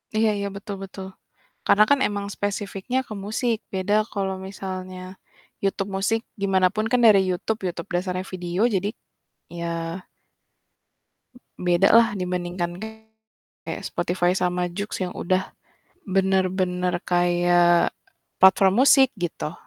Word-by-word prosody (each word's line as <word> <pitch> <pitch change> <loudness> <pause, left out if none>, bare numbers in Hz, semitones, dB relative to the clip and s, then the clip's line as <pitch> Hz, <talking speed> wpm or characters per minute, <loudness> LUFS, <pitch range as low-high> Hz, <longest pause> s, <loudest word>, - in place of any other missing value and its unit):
Iya 220 0 +3
iya, 200 0 -2
betul 200 0 -6
betul. 190 0 -8 0.6
Karena 210 - +5
kan 285 - +5
emang 205 -1 -3
spesifiknya 205 +4 -3
ke 215 - -6
musik. 225 +2 -1 0.2
Beda 190 +2 0 0.2
kalau 195 -2 -2
misalnya 185 -1 -7 0.4
YouTube 195 0 -1
Music, 225 +4 +1 0.2
gimanapun 195 +2 +2
kan 250 0 +3
dari 205 -3 +7
YouTube, 210 +5 -2
YouTube 170 -1 -5
dasarnya 185 +1 -1
video 180 +1 -4
jadi 195 +1 0 0.7
ya 170 0 -3 1.9
bedalah 195 +5 +4
dibandingkan 180 -1 -3
kayak 220 0 -11
Spotify 175 +1 0
sama 180 -1 -1
Joox 200 +1 -4
yang 180 - -4
udah 185 +2 -1 0.6
bener-bener 185 -1 +1
kayak 175 -1 +3 0.5
platform 190 +3 +6
musik, 270 -1 +6
gitu. 165 -3 -3
190 Hz, 115 wpm, -24 LUFS, 180-205 Hz, 1.9 s, dari